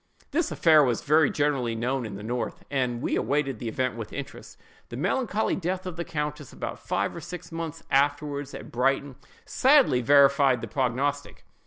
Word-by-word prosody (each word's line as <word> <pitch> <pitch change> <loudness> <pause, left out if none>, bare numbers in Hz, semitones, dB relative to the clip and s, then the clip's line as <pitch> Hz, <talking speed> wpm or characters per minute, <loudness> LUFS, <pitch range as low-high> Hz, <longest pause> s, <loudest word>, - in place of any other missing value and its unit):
This 330 +2 0
affair 155 -3 +5
was 120 -4 0
very 150 0 +4
generally 135 -6 0
known 125 +1 -2
in 100 - -7
the 100 - -8
north, 120 +3 -4
and 125 -3 -1
we - - 0
awaited 140 -5 0
the 120 - -5
event 130 +1 -1
with 115 -2 -7
interest. 140 -1 -8 0.3
The - - -7
melancholy 225 -4 0
death 185 +1 -3
of 180 -3 -5
the 170 - -3
countess 150 -3 -4
about - - -6
five - - -2
or - - -7
six 180 -1 -8
months 165 -1 -5
afterward, 145 0 +1
at - - -9
Brighton, 135 +2 0 0.3
sadly 265 - +4
verified 140 -1 +5
the 115 - -5
prognostic. 135 +4 -2
140 Hz, 175 wpm, -26 LUFS, 125-155 Hz, 0.3 s, affair